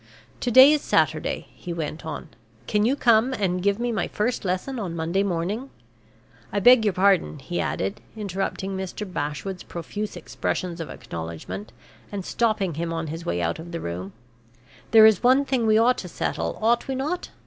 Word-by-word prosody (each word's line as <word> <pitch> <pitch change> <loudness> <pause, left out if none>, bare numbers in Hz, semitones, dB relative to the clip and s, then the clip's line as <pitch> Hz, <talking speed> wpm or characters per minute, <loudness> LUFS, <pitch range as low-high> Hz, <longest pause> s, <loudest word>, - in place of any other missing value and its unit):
"To 245 - -1
day 260 +4 +9
is 300 - +1
Saturday," - - +1
he 180 - -8
went 160 -1 -5
on. 160 - -6 0.4
"Can 210 0 +1
you 265 - +2
come 240 -1 +4
and 185 -6 0
give 200 +1 +2
me 240 +1 -1
my 215 -6 -1
first 235 +4 -1
lesson 195 +8 -2
on 180 -6 -4
Monday 170 +4 0
morning? 200 +7 -2 0.8
I 205 - 0
beg 245 +2 +7
your 205 -3 +2
pardon," 190 -4 +3
he 175 +5 -4
added, 100 +4 -2 0.2
interrupting 195 -1 -3
Mr. 190 +2 -4
Bashwood's 165 +1 -4
profuse 205 +4 -5
expressions 175 +1 -3
of 160 - -6
acknowledgment, 85 - -7 0.4
and 200 -3 -5
stopping 215 -6 0
him 165 +2 -3
on 165 0 -2
his 165 +1 -7
way 85 0 0
out 85 - -1
of 170 +1 -9
the 170 - -4
room; 90 - -5 0.8
"there 220 -1 +8
is 220 -4 +5
one 260 +3 +4
thing 255 -4 0
we 215 0 +5
ought 240 +3 +4
to 180 - -6
settle, 170 - -3
ought 235 +2 +2
we 265 - -2
not? 300 +7 -3
195 Hz, 180 wpm, -24 LUFS, 170-225 Hz, 0.8 s, day